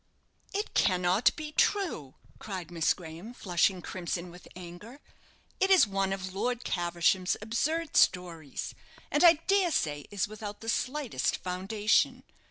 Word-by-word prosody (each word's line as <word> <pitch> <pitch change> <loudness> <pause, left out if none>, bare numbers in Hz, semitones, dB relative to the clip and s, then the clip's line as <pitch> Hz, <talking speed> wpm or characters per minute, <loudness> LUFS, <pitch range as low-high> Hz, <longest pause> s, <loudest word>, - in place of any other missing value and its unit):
"It 415 +1 -3
cannot 185 +2 +3
be 305 -1 -6
true," 305 - 0 0.2
cried 185 -4 -6
Miss 165 -2 +2
Graham, 175 +7 -10
flushing 180 -1 +1
crimson 175 -1 -4
with 175 0 -14
anger. 185 +9 -10 0.6
"It 385 - +3
is 380 -7 +7
one 195 -2 -1
of 190 -1 -4
Lord 245 +5 -2
Caversham's 175 +1 +1
absurd 295 +9 -1
stories; 170 -5 +1 0.4
and 295 - +2
I 340 -1 +10
dare 390 -2 +3
say 145 - -1
is 200 -1 -1
without 210 -1 -8
the 225 - -5
slightest 250 - -1
foundation. 195 +4 0
195 Hz, 135 wpm, -29 LUFS, 175-245 Hz, 0.6 s, I